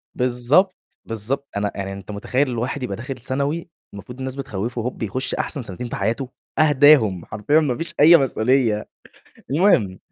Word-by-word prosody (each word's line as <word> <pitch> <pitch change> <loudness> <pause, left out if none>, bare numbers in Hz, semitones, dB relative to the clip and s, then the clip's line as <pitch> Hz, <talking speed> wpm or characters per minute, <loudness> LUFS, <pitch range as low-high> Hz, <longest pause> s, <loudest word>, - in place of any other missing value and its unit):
بالضبط، 125 +9 +2 0.3
بالضبط، 115 +6 -3
أنا 100 0 -1
يعني 95 0 -4
أنت 100 +2 -9
متخيّل 125 +7 -1
الواحد 125 +3 -3
يبقى 100 -6 -3
داخل 130 +2 -6
ثانوي 140 +7 -3 0.2
المفروض 120 +5 -10
الناس 130 0 -4
بتخوّفه، 120 -2 -4
هوب 125 -1 -4
يخُش 130 +6 -2
أحسن 145 - -3
سنتين 120 +2 -7
في - - -4
حياته، 125 +3 -2 0.3
أهداهم 145 - +5
حرفيًا 110 +9 +1
ما 140 -6 0
فيش 165 +1 -1
أي 165 +3 +9
مسؤولية، 125 -4 +1 0.7
المهم 135 - +3
125 Hz, 155 wpm, -21 LUFS, 110-140 Hz, 0.7 s, أي